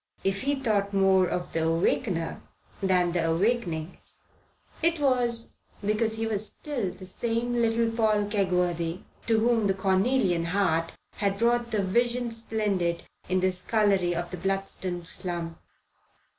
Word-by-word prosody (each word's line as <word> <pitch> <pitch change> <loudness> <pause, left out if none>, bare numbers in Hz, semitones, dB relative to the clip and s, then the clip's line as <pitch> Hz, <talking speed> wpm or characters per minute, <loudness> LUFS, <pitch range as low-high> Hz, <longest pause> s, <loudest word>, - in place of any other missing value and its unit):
If 195 0 0
he 280 +2 +1
thought 205 -7 0
more 190 -1 +4
of 175 0 -3
the 160 0 +1
awakener 165 +1 0 0.4
than 180 -2 +2
the 170 -1 0
awakening, 175 -3 0 0.8
it 335 0 +2
was 245 -4 +1 0.3
because 220 +1 +1
he 225 0 -2
was 215 -1 0
the 250 -11 -3
same 230 +5 -2
little 230 -1 +2
Paul 215 -2 +2
Kegworthy 180 -4 0 0.3
to 225 -1 +3
whom 225 -2 +2
the 195 - +1
cornelian 190 -2 +2
heart 165 -3 +1 0.2
had 200 -1 0
brought 235 +1 +2
the 215 -3 0
Vision 240 +4 +1
Splendid 205 -7 -1 0.3
in 185 0 +2
the 185 0 +3
scullery 185 -1 +1
of 175 +1 -3
the 180 - -4
Bludston 190 -1 -3
slum. 170 -1 -4
195 Hz, 135 wpm, -27 LUFS, 180-230 Hz, 0.8 s, more